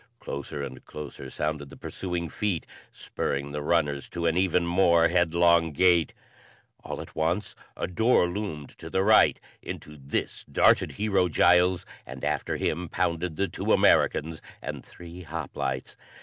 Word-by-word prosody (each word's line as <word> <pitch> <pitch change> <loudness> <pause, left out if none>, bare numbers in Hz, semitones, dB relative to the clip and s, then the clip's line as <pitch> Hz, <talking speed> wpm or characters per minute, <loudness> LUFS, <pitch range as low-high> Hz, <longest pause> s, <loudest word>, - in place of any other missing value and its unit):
Closer 70 +1 -5
and 65 -2 -8
closer 75 -1 -8
sounded 75 -2 -3
the - - -12
pursuing 90 -2 -4
feet, 95 0 -2 0.3
spurring 70 +1 -3
the 75 0 -4
runners 75 -3 0
to 85 -1 -4
an 80 -1 +2
even 90 -1 +2
more 85 -1 +4
headlong 85 -1 +3
gait. 85 +1 +3 0.7
All - - -5
at - - -12
once 85 +6 -1 0.2
a - - -1
door 100 +1 +3
loomed 85 -6 -5
to - - -8
the 95 - +1
right; 110 +2 +5 0.2
into 75 0 -8
this 70 0 -3
darted - - +4
Hero 100 -4 +1
Giles 90 +2 +4 0.2
and 65 +1 -7
after - - -1
him 85 +1 -2
pounded 85 0 -1
the 100 +3 0
two 85 - -3
Americans 80 +1 +3 0.2
and - - -6
three 85 +1 -11
hoplites. 75 -5 -4
85 Hz, 150 wpm, -27 LUFS, 75-90 Hz, 0.7 s, right